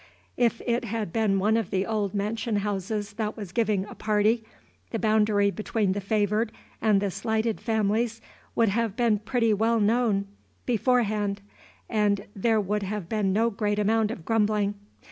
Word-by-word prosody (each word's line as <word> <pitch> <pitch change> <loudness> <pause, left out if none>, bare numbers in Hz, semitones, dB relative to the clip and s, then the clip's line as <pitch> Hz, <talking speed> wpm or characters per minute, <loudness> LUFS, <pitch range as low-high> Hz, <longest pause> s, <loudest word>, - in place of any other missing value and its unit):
If 235 -1 +1
it 240 0 0
had 215 -5 -3
been 215 -3 +2
one 210 +3 +2
of 225 -5 0
the 190 0 0
old 210 -2 -1
mansion 215 +3 -1
houses 205 +1 -2
that 215 0 -3
was 200 -5 -7
giving 210 -3 +1
a - - -10
party, 215 +2 +1 0.5
the 230 - -2
boundary 210 -2 +3
between 215 -1 -1
the 200 +2 -2
favored 210 +2 +1 0.3
and 215 -3 +4
the 200 -1 -1
slighted 220 +1 -1
families 220 +1 0 0.4
would 230 -2 +3
have 225 0 0
been 235 -2 +3
known 210 - 0
pretty 230 -1 +2
well 220 -1 +2 0.4
beforehand, 215 -4 +1 0.5
and 205 -2 +1
there 220 +2 +2
would 210 +1 -1
have 200 -2 -4
been 210 -3 +1
no 225 +4 +2
great 205 -1 -1
amount 215 +1 +2
of 195 -8 -7
grumbling. 210 -2 +1
215 Hz, 165 wpm, -26 LUFS, 205-225 Hz, 0.5 s, and